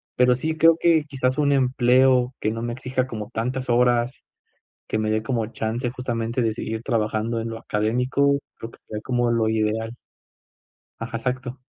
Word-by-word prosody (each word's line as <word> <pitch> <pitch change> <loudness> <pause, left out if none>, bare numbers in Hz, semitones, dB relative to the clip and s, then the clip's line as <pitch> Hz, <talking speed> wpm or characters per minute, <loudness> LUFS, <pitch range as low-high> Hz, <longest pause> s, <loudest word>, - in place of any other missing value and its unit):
pero 125 0 +4
sí 160 +5 -2
creo 165 0 +6
que 165 -3 +4
quizás 130 -2 -1
un 145 -1 +3
empleo 130 -1 +3
que 110 - 0
no 115 +1 -4
me 120 0 -2
exija 130 +1 -2
como 110 -4 -6
tantas 125 +3 -3
horas, 120 +1 +2 0.7
que - - -1
me 110 - 0
dé 110 - +1
como 115 -2 -1
chance 115 +2 -3
justamente 120 -1 -2
de 115 -2 +1
seguir 110 +1 -4
trabajando 115 -1 -1
en 115 - -4
lo 115 - -6
académico, 125 +7 +1 0.2
creo 115 +1 -8
que - - -17
sería 105 -1 -6
como 120 0 0
lo 115 -1 +2
ideal. 110 +1 0 1.1
Ajá, 115 0 -5
exacto. 125 +1 -3
120 Hz, 175 wpm, -23 LUFS, 115-130 Hz, 1.1 s, creo